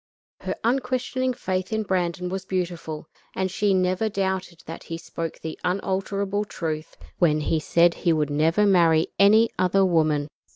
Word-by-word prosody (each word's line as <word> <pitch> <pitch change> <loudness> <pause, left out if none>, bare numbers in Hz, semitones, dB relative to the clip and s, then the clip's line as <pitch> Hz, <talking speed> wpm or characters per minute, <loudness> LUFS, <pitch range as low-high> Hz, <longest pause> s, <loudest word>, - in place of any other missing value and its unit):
Her - - -4
unquestioning 255 +1 0
faith 185 -2 -3
in 220 0 0
Brandon 180 -2 -1
was 190 +1 -4
beautiful, 170 -4 -4 0.3
and 190 -1 -1
she 205 +1 +1
never 185 +4 +1
doubted 190 -3 -3
that 165 - -8
he 165 - -5
spoke 165 -1 -6
the 160 -1 -7
unalterable 195 +2 -1
truth 160 -6 -5 0.2
when 155 -4 +3
he 160 +1 0
said 170 +2 +3
he 170 - 0
would 150 -2 0
never 160 +8 +2
marry 170 -5 +4
any 215 +3 +6
other 190 +1 +3
woman. 155 -5 +2
185 Hz, 155 wpm, -24 LUFS, 165-200 Hz, 0.3 s, any